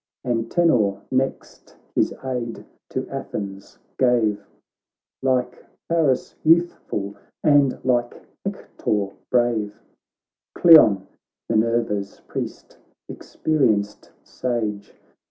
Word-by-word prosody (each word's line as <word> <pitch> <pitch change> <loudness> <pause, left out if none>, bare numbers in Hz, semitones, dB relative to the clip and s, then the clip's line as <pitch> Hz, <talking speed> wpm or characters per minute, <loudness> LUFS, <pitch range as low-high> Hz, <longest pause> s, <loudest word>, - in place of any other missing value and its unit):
Antenor 115 - +2
next 130 +1 -3 0.2
his - - +2
aid 125 -3 -4 0.2
to - - -3
Athens 100 -1 -6 0.2
gave, 115 -5 +2 0.8
Like 125 -2 0 0.2
Paris 160 -6 +1
youthful, 160 - +1 0.3
and 145 -3 +4
like 120 -2 +1 0.2
Hector 100 -2 -2 0.2
brave; 115 -4 +1 0.8
Cleon, 110 - +7 0.5
Minerva's 110 -3 0
priest, - - -6 0.3
experienced 110 -10 -1
sage. 110 -5 -3
120 Hz, 75 wpm, -23 LUFS, 105-130 Hz, 0.8 s, Cleon